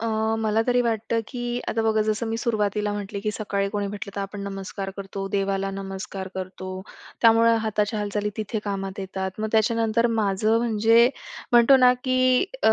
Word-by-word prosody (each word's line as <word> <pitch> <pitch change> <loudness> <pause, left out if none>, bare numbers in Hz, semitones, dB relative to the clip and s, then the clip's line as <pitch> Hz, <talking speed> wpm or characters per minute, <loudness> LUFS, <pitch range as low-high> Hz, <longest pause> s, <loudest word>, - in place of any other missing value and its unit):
अ, 230 - -2 0.3
मला 220 0 +1
तरी 245 0 +3
वाटतं, 225 0 0
की 245 -1 -3
आता 225 - 0
बघा 220 -1 +2
जसं 215 +2 -1
मी 225 - -1
सुरुवातीला 210 -2 0
म्हटले, 205 0 -5
की 215 +1 -1
सकाळी 200 -2 -2
कोणी 205 -1 -2
म्हटलं 200 0 -7
तर - - -1
आपण 200 +1 -5
नमस्कार 195 0 -5
करतो, 195 0 -5
देवाला 195 -1 0
नमस्कार 195 0 -6
करतो. 185 0 -6 0.5
त्यामुळं 230 0 +6
हाताच्या 210 0 0
हालचाली 210 0 -2
तिथे 215 +1 -3
कामात 195 -1 -4
येतात. 190 0 -4
मग 220 - -1
त्याच्यानंतर 225 +1 +2
माझं 215 +2 +2
म्हणजे 230 +1 +4 0.4
म्हणतो 240 +3 +7
ना, 250 -1 +6
की 255 +1 +3 0.2
अ, - - +6
210 Hz, 170 wpm, -24 LUFS, 195-230 Hz, 0.5 s, म्हणतो